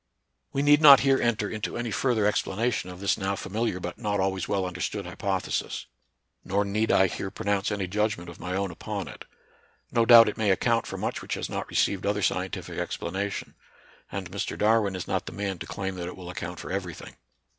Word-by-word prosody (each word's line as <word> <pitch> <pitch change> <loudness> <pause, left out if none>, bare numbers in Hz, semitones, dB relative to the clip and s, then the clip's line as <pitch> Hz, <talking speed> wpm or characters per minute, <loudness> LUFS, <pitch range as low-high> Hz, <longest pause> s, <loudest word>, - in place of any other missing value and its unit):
We 140 - 0
need 145 +1 +6
not 140 -3 +10
here 135 -1 +3
enter 110 -3 +1
into 110 0 -4
any 120 -1 -3
further 115 -1 +1
ex 105 - +3
planation 105 -2 -2
of 90 - -10
this 100 - +1
now 100 0 -1
familiar 110 -1 -2
but 90 -1 -6
not 105 -3 -1
always 95 0 0
well 100 -2 0
understood 90 +2 -3
hypothesis; 95 +1 -2 0.6
nor 100 +2 0
need 105 +3 0
I 95 - +5
here 95 +1 -3
pronounce 100 +1 -1
any 100 -2 -1
judgment 100 -2 -1
of 85 0 -10
my 90 0 -3
own 100 -1 -1
upon 80 - -5
it. - - -10 0.7
No 115 -1 +2
doubt 115 -1 +10
it 105 - -2
may 110 -2 +1
account 115 +5 +2
for - - -5
much - - -3
which - - -3
has - - -4
not - - -4
received 100 -1 +1
other 105 0 0
scientific 95 -1 -2
explanation; 95 +4 -3 0.6
and 95 -3 -5
Mr. 100 - -3
Darwin 105 -2 +3
is 90 - -5
not - - -1
the - - -6
man 100 -3 -3
to - - -7
claim 95 -1 -3
that 85 -1 -4
it 90 - -7
will 90 -1 -7
account 90 0 -6
for - - -7
every 90 -4 -3
thing. - - -11
100 Hz, 210 wpm, -27 LUFS, 95-110 Hz, 0.7 s, not